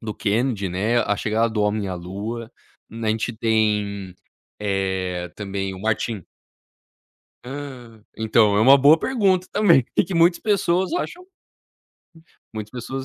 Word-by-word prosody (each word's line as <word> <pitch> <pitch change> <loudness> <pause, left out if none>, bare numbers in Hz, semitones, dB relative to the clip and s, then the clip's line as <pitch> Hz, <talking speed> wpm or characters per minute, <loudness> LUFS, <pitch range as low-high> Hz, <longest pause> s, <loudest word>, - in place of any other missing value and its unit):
do 110 -2 -5
Kennedy, 105 -2 0
né, 105 +7 0
a 105 - 0
chegada 110 +2 0
do 110 -1 -1
homem 105 -1 0
à 90 - -3
lua, 105 +6 -6 0.4
a 115 -1 -3
gente 110 +2 -1
tem, 105 -4 0 0.5
eh, 95 -3 -2
também 95 -2 -4
o 95 - -10
Martin 110 -2 -1 1.2
Hã. 125 -5 -9
Então, 110 -2 +3
é - - +3
uma 135 +4 +8
boa 145 +4 +6
pergunta 195 -8 +1
também, 170 - +4 0.2
que 185 - -6
muitas 170 +1 +4
pessoas 190 - +1
acham, 355 0 -3
que 370 - -27 1.2
muitas 110 -1 -6
pessoas 130 +2 -5
110 Hz, 140 wpm, -22 LUFS, 100-135 Hz, 1.2 s, uma